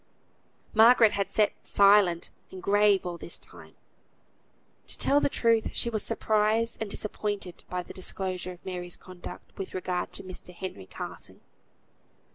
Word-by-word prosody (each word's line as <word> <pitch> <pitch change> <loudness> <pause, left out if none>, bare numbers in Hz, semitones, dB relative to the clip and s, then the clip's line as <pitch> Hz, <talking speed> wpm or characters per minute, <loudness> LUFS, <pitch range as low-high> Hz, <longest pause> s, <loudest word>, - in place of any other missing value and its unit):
Margaret 225 0 +7
had 200 -1 -1
sat 210 -1 +3
silent 200 -4 +4 0.2
and 185 -1 -10
grave 205 -1 +4
all 175 -1 -4
this 170 - -3
time. - - -13 1.1
To - - -5
tell 285 - +4
the - - +1
truth, 230 -4 +1
she 235 - 0
was 215 -2 0
surprised 220 +3 +1
and 220 - -2
disappointed 205 -3 -3
by 180 0 -2
the - - -11
disclosure 185 -1 -3
of 175 - -19
Mary's 180 -1 -4
conduct, 185 -1 -11
with 190 - -5
regard 180 -1 -2
to - - -5
Mr. 180 -1 -9
Henry 170 - -7
Carson. - - -8
195 Hz, 145 wpm, -28 LUFS, 180-215 Hz, 1.1 s, Margaret